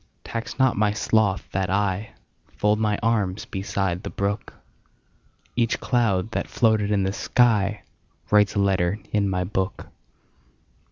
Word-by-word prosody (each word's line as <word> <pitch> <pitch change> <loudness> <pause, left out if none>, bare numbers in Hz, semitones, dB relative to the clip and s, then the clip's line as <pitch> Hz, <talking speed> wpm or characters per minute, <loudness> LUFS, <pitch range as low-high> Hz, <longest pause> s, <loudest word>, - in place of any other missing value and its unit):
Tax 115 0 -5
not 130 -2 +3
my 105 0 +2
sloth 105 -4 +1
that 95 -1 -1
IFold 105 +1 -2
my 105 -2 +1
arms 105 -4 0
beside 95 -2 -2
the - - -6
brook; 100 +1 -3 1.0
Each 115 -1 +1
cloud 110 -5 +1
that - - -2
floated 110 -3 +2
in 100 -2 +2
the 95 - 0
skyWrites 105 -2 +1
a - - +1
letter 95 -1 +2 0.2
in 100 -2 +2
my 90 -1 0
book. 95 +1 -3
105 Hz, 125 wpm, -24 LUFS, 95-110 Hz, 1.0 s, not